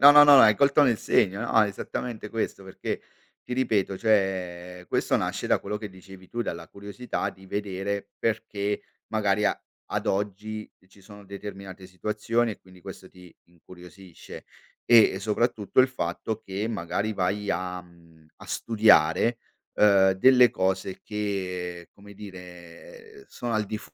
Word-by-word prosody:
no, 140 +2 +10
no, 145 0 +9
no 145 -1 +8
hai 110 -3 +7
colto 140 +3 +4
nel 125 -5 +3
segno, 100 -2 +1
no, 110 - +3
esattamente 105 +2 -5
questo, 110 -3 -3
perché 95 - -5 0.4
ti 125 - -7
ripeto, 105 -7 0
cioè, 90 -4 -1
questo - - +1
nasce - - -2
da - - +3
quello 105 - -4
che 105 0 -7
dicevi 95 0 -14
tu, 120 0 -3
dalla 85 -5 -6
curiosità 100 +5 -5
di 95 0 -17
vedere, 100 0 -3
perché 105 -2 -2 0.3
magari 105 -1 +1
a - - +1 0.3
ad - - -2
oggi 105 +2 -3 0.2
ci 95 +1 -21
sono 100 +1 -14
determinate 100 -1 -9
situazioni 105 +5 -1
e - - -14
quindi 95 -1 -18
questo 95 0 -10
ti 90 -2 -16
incuriosisce 90 +1 -13 0.4
e 115 -5 +6
soprattutto 110 +2 +1
il 130 - +4
fatto 110 -2 -3
che 100 +1 -4
magari 105 +1 -2
vai 100 +2 -1
a 90 0 -3
mhmm, 85 -2 -21
a - - -14
studiare, 110 -1 +3 0.4
uhm, 100 -2 +5
delle 125 +5 +6
cose 95 0 -2
che, 90 -4 -4
come 100 0 -15
dire, 90 - -12
ehm, 410 - -14
sono 120 -1 -5
al 110 -1 +1
di 105 +1 -5
100 Hz, 150 wpm, -26 LUFS, 95-110 Hz, 0.4 s, no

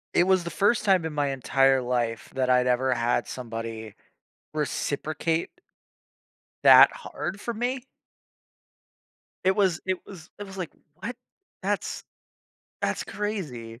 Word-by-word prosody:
It 175 - +5
was 190 -2 +4
the 170 - -4
1st 205 +8 +2
time 190 -5 +3
in 160 - -3
my 145 -1 +1
entire 135 0 +3
life 120 -2 -2
that 130 -1 +1
I'd 125 0 +4
ever 130 +1 +2
had 120 0 0
somebody 115 -3 -6 0.6
reciprocate 155 +2 -1 1.1
that - - +9
hard 175 +7 -6
for 235 - -3
me. 245 +3 -2 1.6
It 190 0 +4
was 190 -6 +2
it 185 -1 -2
was 175 -5 -12
it 205 - -6
was 195 -1 -10
like, 180 -4 -4 0.3
"What? 240 +3 -5 0.5
That's - - -2 0.8
that's - - -1
crazy." 140 - -5
150 Hz, 130 wpm, -26 LUFS, 125-190 Hz, 1.6 s, that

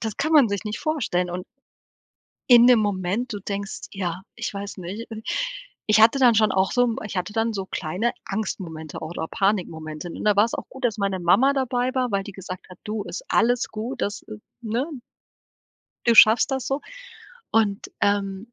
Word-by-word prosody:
das 220 -2 -4
kann 310 +3 -1
man 280 -8 +6
sich 200 +1 -3
nicht 210 0 -4
vorstellen 220 - -1
und 180 +1 -5 1.1
in 240 -1 +9
dem 245 -2 +7
Moment, 205 +4 -1
du 205 - -5
denkst: 200 +1 -5
„Ja, 180 -2 -3
ich 235 -1 -4
weiß 200 0 -6
nicht.“ 200 +7 -7
Und 220 -1 -7 0.6
ich 215 0 +4
hatte 225 +5 +6
dann 245 -3 +6
schon 215 0 +4
auch 190 0 +1
so 245 -1 +4
m 235 0 -1
ich 210 - -6
hatte 180 +3 -4
dann 225 0 +1
so 195 -3 -4
kleine 190 +8 -2
Angstmomente 175 -7 -5
oder 160 0 -5
Panikmomente. 170 -5 -2
Und - - -7
da 210 -1 +4
war's 210 +3 +3
auch - - -6
gut, 265 -1 -10
dass 230 -3 +1
meine 195 -2 -1
Mama 200 +11 +4
dabei 255 -1 -1
war, 255 -1 0
weil 200 -1 0
die 205 - -8
gesagt 185 -1 -9
hat: 185 - -12
„Du, 215 -1 -3
ist - - -6
alles 245 +1 +2
gut, 225 +4 -5
das“ 205 +1 -2
äh, 215 - -9 0.3
ne 235 +4 -1 1.2
„du 235 - +5
schaffst 225 +4 +7
das 265 -1 -2
so“ 275 +2 -1 0.7
und, 210 -3 +1
ähm, 200 +2 0
210 Hz, 190 wpm, -24 LUFS, 190-235 Hz, 1.2 s, in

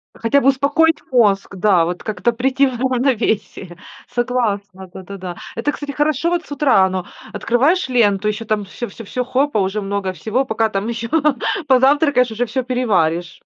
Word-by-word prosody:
Хотя 275 +5 +1
бы 270 - +1
успокоить 290 +4 +2
мозг, 200 -5 +2
да. 180 -3 +3
Вот 175 +1 -4
как-то 215 +2 -1
прийти 265 +3 +1
в 245 -2 -5
равновесие. 240 -8 -1 0.3
Согласна, 205 -6 -2
да-да-да. 185 -2 -8 0.2
Это, 240 +6 -1
кстати, 290 -1 -6
хорошо 300 +3 0
вот 345 -1 -1
с - - -19
утра, 265 -9 +3
оно 185 -1 -3 0.3
открываешь 265 - +1
ленту, 210 -5 +2
еще 215 +2 -2
там 210 -2 -1
всё 235 +5 -6
всё 230 - -11
всё, 250 +5 -3
хоба, 260 -2 0
уже 195 +2 -1
много 195 -1 -2
всего. 235 +8 -1
Пока 220 -2 0
там 200 +2 -3
еще 230 0 -4 0.6
позавтракаешь, 265 -1 +3
уже 240 +3 -1
всё 255 +3 -2
переваришь. 180 -10 0
230 Hz, 165 wpm, -18 LUFS, 200-265 Hz, 0.6 s, да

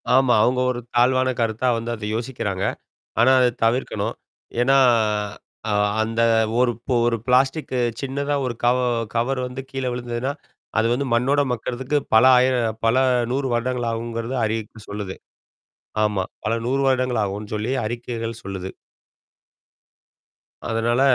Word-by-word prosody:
ஆமா. 130 -2 +4
அவங்க 125 +2 +2
ஒரு 120 - -4 0.2
தாழ்வான 130 +1 +3
கருத்தா 115 +2 0
வந்து 115 +1 -4
அத 105 -1 -7
யோசிக்கிறாங்க. 110 -5 -3 0.6
ஆனா 125 +3 +6
அத 125 - +5 0.2
தவிர்க்கணும். 120 +3 0 0.5
ஏன்னா 135 +2 +4 0.9
அ-அந்த-ஒரு 110 +3 +2 0.3
ஒரு 115 -1 +2
பிளாஸ்டிக்கு 130 +1 +2 0.2
சின்னதா 140 +1 -2
ஒரு 120 - -2
கவ-கவர் 120 0 +1
வந்து 125 +1 -6
கீழ 135 -1 -4
விழுந்ததுன்னா, 120 +2 -3 0.5
அது 110 - +3
வந்து 140 +3 0
மண்ணோட 135 +5 +2
மக்குறதுக்கு 125 +5 -2 0.2
பல 110 +3 +7
ஆயிர 130 +1 +3 0.3
பல 115 - +3 0.4
100 135 +1 0
வருடங்கள் 120 0 -1
ஆகும்கறது 115 +2 -4
அறிவிப்பு 110 0 -3
சொல்லுது. 100 -2 -5 0.9
ஆமா. 105 -3 0 0.2
பல 110 - +1
100 135 +2 +1
வருடங்கள் 130 -3 +1
ஆகும்னு 105 +2 -5
சொல்லி 110 +4 -2
அறிக்கைகள் 115 0 -4
சொல்லுது. 95 -1 -5 2.0
அதனால 115 +2 +1
120 Hz, 120 wpm, -22 LUFS, 115-130 Hz, 2.0 s, பல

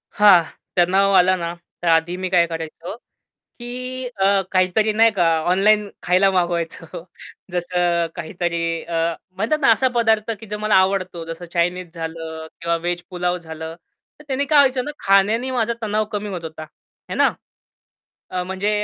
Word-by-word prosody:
हां, 200 -4 +7 0.3
तणाव 190 +3 +3
आला 185 0 +5
ना, 170 -1 -4 0.3
तर - - -1
आधी 165 +1 +3
मी 185 0 -3
काय 175 -2 +4
करायचो, 165 +2 -6 0.6
की 255 +1 -5
अ, 200 -3 +2
काहीतरी 185 +4 +2
नाही 225 +2 +5
का 185 -4 +1 0.3
ऑनलाईन 205 +3 +3
खायला 185 +2 +3
मागवायचो. 170 -3 -2 0.5
जसं 175 -1 0
काहीतरी 170 0 -2
अ, 165 0 -1 0.2
म्हणतात 225 +10 0
ना, 270 - +5
असा 230 +4 +2
पदार्थ, 225 -2 +2
की 225 - -10
जो 210 +1 -5
मला 215 0 +1
आवडतो. 185 -2 +1
जसं 165 +1 -7
चायनीज 175 0 -1
झालं, 160 -1 -6
किंवा 170 0 0
व्हेज 175 +1 -3
पुलाव 180 0 -1
झालं. 160 -1 -8 0.5
तर - - -13
त्यानी 275 +1 0
काय 300 +1 +3
व्हायचं 260 -3 +4
ना, 295 - -4
खाण्यानी 205 +6 +3
माझा 235 -3 0
तणाव 215 0 0
कमी 210 0 -3
होत 180 -4 -6
होता, 160 -1 -7 0.5
हे - - -2
ना. - - +3 1.0
अ, 180 -1 -2
म्हणजे 190 +3 -2
185 Hz, 160 wpm, -21 LUFS, 170-210 Hz, 1.0 s, हां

